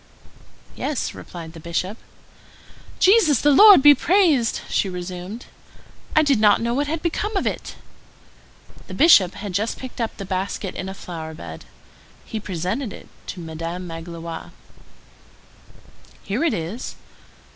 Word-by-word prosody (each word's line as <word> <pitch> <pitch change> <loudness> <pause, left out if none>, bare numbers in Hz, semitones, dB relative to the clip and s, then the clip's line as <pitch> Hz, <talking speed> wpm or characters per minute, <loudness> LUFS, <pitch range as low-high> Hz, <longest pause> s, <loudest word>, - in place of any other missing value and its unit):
"Yes," 295 -4 -3
replied 165 -2 -9
the 165 - -10
Bishop. 170 +5 -3 1.0
"Jesus 370 - +4
the 295 - +4
Lord 400 -1 +9
be 290 0 +10
blessed!" 320 - +2
she 195 - 0
resumed; 180 +5 -7 0.7
"I 310 - +6
did 280 -6 +2
not 210 -1 +5
know 235 +1 -1
what 285 +3 0
had 315 +1 -3
become 410 +5 -1
of - - -1
it." - - -4 1.1
The - - -7
Bishop 205 - +6
had 205 -2 -6
just 210 +5 -1
picked 255 -2 -7
up 225 - -3
the 195 - -6
basket 190 +1 -3
in 190 - -5
a 190 - -7
flower 160 -4 -7
bed. 80 - -9 0.6
He 220 - -5
presented 195 - -3
it - - -12 0.2
to 185 - -6
Madame 165 +2 -5
Magloire. 165 0 -8 1.7
"Here 215 +10 -2
it 325 -9 +2
is." 185 +8 -5
205 Hz, 140 wpm, -22 LUFS, 175-285 Hz, 1.7 s, be